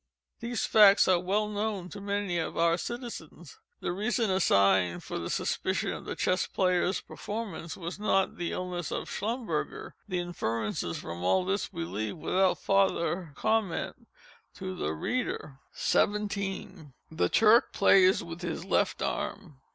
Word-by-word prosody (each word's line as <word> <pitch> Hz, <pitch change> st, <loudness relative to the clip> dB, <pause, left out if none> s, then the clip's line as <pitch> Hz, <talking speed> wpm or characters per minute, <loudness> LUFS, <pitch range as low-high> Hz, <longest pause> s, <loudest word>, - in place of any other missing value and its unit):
These 235 Hz, 0 st, -2 dB
facts 205 Hz, -2 st, +7 dB
are 185 Hz, -2 st, +4 dB
well 200 Hz, +4 st, 0 dB
known 210 Hz, -3 st, -2 dB
to 200 Hz, -, -8 dB
many 200 Hz, -3 st, -1 dB
of 160 Hz, -, -3 dB
our 170 Hz, 0 st, +4 dB
citizens. 180 Hz, -, -7 dB, 0.2 s
The -, -, -1 dB
reason 215 Hz, +3 st, 0 dB
assigned 95 Hz, -, +3 dB
for -, -, -4 dB
the 85 Hz, -, -4 dB
suspension -, -, -1 dB
of -, -, -8 dB
the -, -, -4 dB
Chess 185 Hz, +1 st, +1 dB
Player's 185 Hz, 0 st, +1 dB
performances, 205 Hz, -6 st, -6 dB
was 175 Hz, +1 st, -6 dB
_not 195 Hz, -2 st, +1 dB
_the 175 Hz, -1 st, -3 dB
illness 180 Hz, -2 st, -3 dB
of -, -, -3 dB
_Schlumberger. 215 Hz, -6 st, -3 dB, 0.2 s
_The 185 Hz, -, -1 dB
inferences 115 Hz, -, -2 dB
from 85 Hz, +1 st, -6 dB
all 180 Hz, -, +2 dB
this 195 Hz, +2 st, -1 dB
we 85 Hz, -, -4 dB
leave, 100 Hz, +5 st, -4 dB
without 185 Hz, +4 st, +2 dB
farther 185 Hz, -3 st, +1 dB
comment, 220 Hz, -3 st, -1 dB, 0.5 s
to 185 Hz, -1 st, -5 dB
the 80 Hz, -, -2 dB
reader. 140 Hz, -, -3 dB
17. 200 Hz, -7 st, -1 dB, 0.2 s
The 160 Hz, -, +1 dB
Turk 225 Hz, +3 st, +5 dB
plays 190 Hz, -1 st, +5 dB
with 170 Hz, +1 st, -8 dB
his 175 Hz, 0 st, -4 dB
left 195 Hz, -, +1 dB
arm. 150 Hz, -9 st, -4 dB
185 Hz, 145 wpm, -29 LUFS, 165-205 Hz, 0.5 s, facts